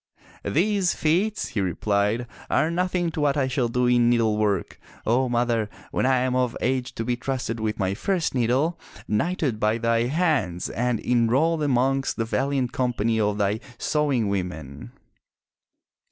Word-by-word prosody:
"These 190 Hz, +2 st, +1 dB
feats," 190 Hz, +8 st, 0 dB
he 115 Hz, -6 st, -2 dB
replied, 100 Hz, +5 st, 0 dB, 0.2 s
"are 160 Hz, -, +2 dB
nothing 180 Hz, -1 st, 0 dB
to 160 Hz, -, -3 dB
what 145 Hz, -1 st, +2 dB
I 135 Hz, -2 st, +2 dB
shall 130 Hz, -2 st, 0 dB
do 125 Hz, +2 st, 0 dB
in 120 Hz, -1 st, +4 dB
needlework, 110 Hz, -5 st, +1 dB, 0.3 s
O 125 Hz, +3 st, +2 dB
mother, 120 Hz, -3 st, +1 dB, 0.2 s
when -, -, +1 dB
I 130 Hz, -1 st, +4 dB
am 130 Hz, 0 st, 0 dB
of 125 Hz, -2 st, 0 dB
age 130 Hz, -1 st, -1 dB
to 115 Hz, -, -3 dB
be 125 Hz, 0 st, 0 dB
trusted 125 Hz, -2 st, -3 dB
with 110 Hz, -1 st, -2 dB
my 95 Hz, -2 st, 0 dB
first 175 Hz, -, -1 dB
needle, 135 Hz, +7 st, +1 dB, 0.3 s
knighted 130 Hz, 0 st, 0 dB
by 110 Hz, +1 st, +2 dB
thy 115 Hz, 0 st, +1 dB
hands 135 Hz, -, 0 dB
and 120 Hz, -1 st, 0 dB
enrolled 130 Hz, +7 st, +2 dB
amongst 135 Hz, -1 st, +1 dB
the 115 Hz, -, 0 dB
valiant 130 Hz, +1 st, 0 dB
company 115 Hz, -3 st, 0 dB
of 105 Hz, -1 st, +1 dB
thy 105 Hz, +1 st, 0 dB, 0.2 s
sewing 140 Hz, -6 st, 0 dB
women!" 80 Hz, -10 st, -4 dB
125 Hz, 155 wpm, -24 LUFS, 110-140 Hz, 0.3 s, in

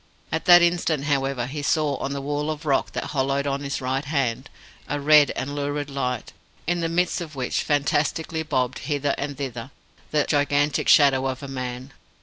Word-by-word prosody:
At -, -, -2 dB
that 175 Hz, -1 st, +8 dB
instant, 170 Hz, -4 st, +1 dB
however, 135 Hz, -3 st, 0 dB
he 145 Hz, +4 st, -5 dB
saw 145 Hz, 0 st, +1 dB
on 135 Hz, -, -4 dB
the 140 Hz, 0 st, -3 dB
wall 145 Hz, +2 st, -2 dB
of 155 Hz, +1 st, -5 dB
rock 140 Hz, -3 st, +1 dB
that -, -, -4 dB
hollowed 140 Hz, 0 st, 0 dB
on 140 Hz, 0 st, -1 dB
his 140 Hz, 0 st, -3 dB
right 130 Hz, +2 st, -1 dB
hand, 135 Hz, -3 st, -1 dB, 0.4 s
a 145 Hz, -, -1 dB
red 150 Hz, 0 st, +6 dB
and 140 Hz, +2 st, -4 dB
lurid 145 Hz, 0 st, -3 dB
light, 125 Hz, -2 st, -3 dB, 0.3 s
in 175 Hz, +2 st, 0 dB
the 165 Hz, -1 st, -1 dB
midst 175 Hz, +1 st, 0 dB
of 155 Hz, -3 st, -7 dB
which 130 Hz, -2 st, -1 dB
fantastically 150 Hz, +2 st, 0 dB
bobbed 130 Hz, -5 st, -1 dB
hither 145 Hz, -1 st, 0 dB
and 145 Hz, -1 st, -4 dB
thither 130 Hz, -3 st, -5 dB, 0.4 s
the 150 Hz, -1 st, +2 dB
gigantic 145 Hz, -1 st, +1 dB
shadow 135 Hz, -2 st, +5 dB
of 130 Hz, +1 st, -4 dB
a -, -, -5 dB
man. 130 Hz, 0 st, -6 dB
145 Hz, 185 wpm, -24 LUFS, 135-150 Hz, 0.4 s, that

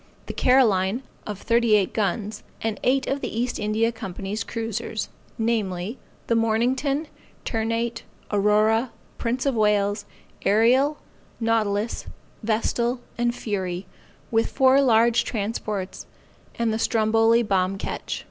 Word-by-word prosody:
The -, -, -5 dB
Caroline 235 Hz, -3 st, +3 dB, 0.2 s
of 210 Hz, -2 st, -4 dB
thirty 230 Hz, +1 st, +3 dB
eight 200 Hz, -3 st, +1 dB
guns; 210 Hz, 0 st, -1 dB, 0.2 s
and 220 Hz, -2 st, -2 dB
eight 265 Hz, +2 st, +2 dB
of 275 Hz, +1 st, -2 dB
the -, -, -2 dB
East 245 Hz, +1 st, -1 dB
India 215 Hz, +2 st, +1 dB
Company's 205 Hz, -2 st, -5 dB
cruisers, 225 Hz, -1 st, -3 dB, 0.3 s
namely, 220 Hz, -2 st, -1 dB, 0.3 s
the -, -, +1 dB
Mornington, 255 Hz, +7 st, +1 dB, 0.4 s
Ternate, 230 Hz, +1 st, -1 dB, 0.3 s
Aurora, 215 Hz, +4 st, +3 dB, 0.3 s
Prince 245 Hz, +3 st, -1 dB
of 275 Hz, -, +2 dB
Wales, 210 Hz, -2 st, +2 dB, 0.4 s
Ariel, 255 Hz, +8 st, +4 dB, 0.4 s
Nautilus, 225 Hz, -1 st, 0 dB, 0.3 s
Vestal 235 Hz, +2 st, 0 dB, 0.2 s
and 240 Hz, 0 st, +1 dB
Fury, 190 Hz, -5 st, -3 dB, 0.5 s
with 225 Hz, 0 st, +2 dB
four 265 Hz, 0 st, +5 dB
large 235 Hz, -2 st, +4 dB
transports, 210 Hz, -3 st, -3 dB, 0.5 s
and 230 Hz, -1 st, 0 dB
the 220 Hz, -, -1 dB
Stromboli 225 Hz, +1 st, +3 dB
bomb 195 Hz, -2 st, +1 dB
ketch. -, -, -4 dB
225 Hz, 120 wpm, -24 LUFS, 210-235 Hz, 0.5 s, four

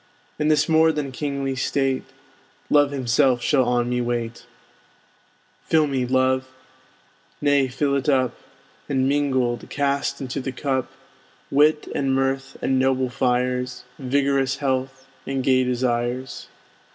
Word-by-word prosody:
In 150 Hz, -, +1 dB
this 150 Hz, -1 st, +3 dB
more 160 Hz, 0 st, +4 dB
than 150 Hz, -3 st, -3 dB
kingly 140 Hz, 0 st, -3 dB
state 135 Hz, 0 st, 0 dB, 0.7 s
Love 145 Hz, -1 st, +5 dB
himself 130 Hz, -2 st, +2 dB
shall 135 Hz, -4 st, +3 dB
on 120 Hz, 0 st, +1 dB
me 125 Hz, 0 st, 0 dB
wait. 120 Hz, -1 st, -3 dB, 1.2 s
Fill 160 Hz, -1 st, +3 dB
to 145 Hz, -, -4 dB
me, 130 Hz, -2 st, 0 dB
Love, 130 Hz, 0 st, +1 dB, 0.9 s
nay 145 Hz, -2 st, +3 dB
fill 140 Hz, +2 st, 0 dB
it 140 Hz, +1 st, 0 dB
up; 130 Hz, -3 st, +2 dB, 0.6 s
And, 135 Hz, -2 st, +1 dB
mingled, 130 Hz, -4 st, 0 dB
cast 140 Hz, -1 st, -1 dB
into 135 Hz, +1 st, -4 dB
the 135 Hz, -, -4 dB
cup 130 Hz, -2 st, -2 dB, 0.6 s
Wit, 150 Hz, +2 st, +3 dB
and 135 Hz, -1 st, 0 dB
mirth, 135 Hz, 0 st, -1 dB
and 130 Hz, -1 st, +2 dB
noble 130 Hz, -1 st, +1 dB
fires, 125 Hz, 0 st, -1 dB, 0.2 s
Vigorous 135 Hz, 0 st, +1 dB
health, 135 Hz, -1 st, -2 dB, 0.2 s
and 135 Hz, -1 st, -2 dB
gay 130 Hz, -1 st, +3 dB
desires. 125 Hz, 0 st, -2 dB
135 Hz, 130 wpm, -23 LUFS, 125-140 Hz, 1.2 s, Love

